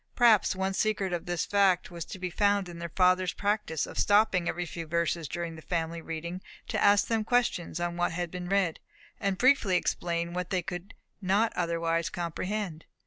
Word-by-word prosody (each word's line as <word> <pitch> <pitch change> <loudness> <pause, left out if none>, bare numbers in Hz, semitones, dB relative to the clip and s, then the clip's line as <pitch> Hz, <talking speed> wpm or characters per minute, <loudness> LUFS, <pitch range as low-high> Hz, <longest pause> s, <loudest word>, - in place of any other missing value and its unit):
Perhaps 230 -6 +5
one 190 +1 -1
secret 200 -2 0
of 175 - -3
this 175 -1 -1
fact 195 -4 +2
was 170 -2 -6
to - - -8
be 180 -1 -4
found 200 0 +2
in 170 -1 -9
their 170 0 -5
father's 185 +1 +3
practice 205 -6 -1
of - - -6
stopping 205 -4 +3
every 175 - -2
few 165 -1 -6
verses 170 0 0
during 170 +2 -4
the 160 - -10
family 165 0 -2
reading 170 +3 -5 0.3
to - - 0
ask 205 0 +5
them 225 -2 0
questions 225 -8 0
on 175 0 -2
what 175 0 +1
had 175 0 -3
been 180 -1 -5
read, 195 -4 +1 0.4
and 195 -2 0
briefly 250 -6 +4
to - - +6
explain 170 -1 -1
what 180 0 -3
they 185 -2 0
could 180 +1 -7 0.3
not 205 +4 +2
otherwise 165 0 0
comprehend. 175 0 -4
180 Hz, 195 wpm, -29 LUFS, 170-200 Hz, 0.4 s, to